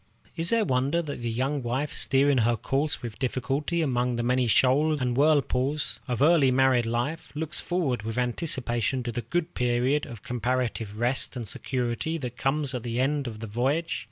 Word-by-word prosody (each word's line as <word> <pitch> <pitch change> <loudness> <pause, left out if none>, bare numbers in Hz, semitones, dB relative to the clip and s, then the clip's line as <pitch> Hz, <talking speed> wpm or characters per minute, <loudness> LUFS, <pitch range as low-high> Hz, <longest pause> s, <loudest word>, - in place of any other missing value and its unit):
Is 165 +1 +1
there 230 -2 +3
wonder 135 +5 +1
that 145 -5 -6
the 120 - -2
young 135 +5 -1
wife, 130 +5 -2
steering 135 0 +2
her 115 +1 +2
course 140 +4 -1
with 115 -3 -6
difficulty 140 +6 -1
among 125 -3 0
the 120 - -1
many 125 0 +2
shoals 145 +6 +3
and 125 -2 0
whirlpools 145 0 +1
of 125 +1 0
early 155 -4 +5
married 130 -2 +3
life, 120 +8 -2
looks 155 0 -2
forward 160 -10 -1
with 110 +2 -5
anticipation 125 - 0
to 120 - -3
the 120 - -3
period 125 -1 0
of 115 -4 -10
comparative 120 -3 -2
rest 125 +4 0
and 120 -3 -5
security 125 +8 -2
that 125 -5 -5
comes 140 +1 -1
at 125 - -3
the 120 +1 -3
end 140 +1 0
of 110 -2 -7
the - - -4
voyage? 135 +10 -1
130 Hz, 180 wpm, -27 LUFS, 120-145 Hz, -, early